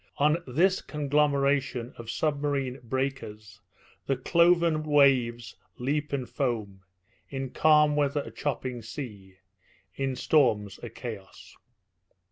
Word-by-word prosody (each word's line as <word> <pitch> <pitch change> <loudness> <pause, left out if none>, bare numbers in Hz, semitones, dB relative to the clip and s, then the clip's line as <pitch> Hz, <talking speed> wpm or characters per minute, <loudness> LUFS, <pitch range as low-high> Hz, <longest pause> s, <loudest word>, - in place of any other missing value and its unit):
On 150 +3 +3
this 175 +9 +2
conglomeration 140 -4 0
of 115 -1 -9
submarine 140 -2 -1
breakers 115 -5 -4 0.5
the 135 - +1
cloven 170 -2 +3
waves 130 -6 +2 0.2
leap 145 +4 -2
and 135 -3 -2
foam 115 -6 -3 0.5
in 135 -2 -5
calm 150 -1 +4
weather, 145 0 +1
a - - -10
chopping 130 -4 -3
sea; 110 -5 -8 0.6
in 135 -1 -2
storms, 115 -9 +2
a - - -6
chaos. 110 -6 -9
135 Hz, 105 wpm, -27 LUFS, 120-150 Hz, 0.6 s, calm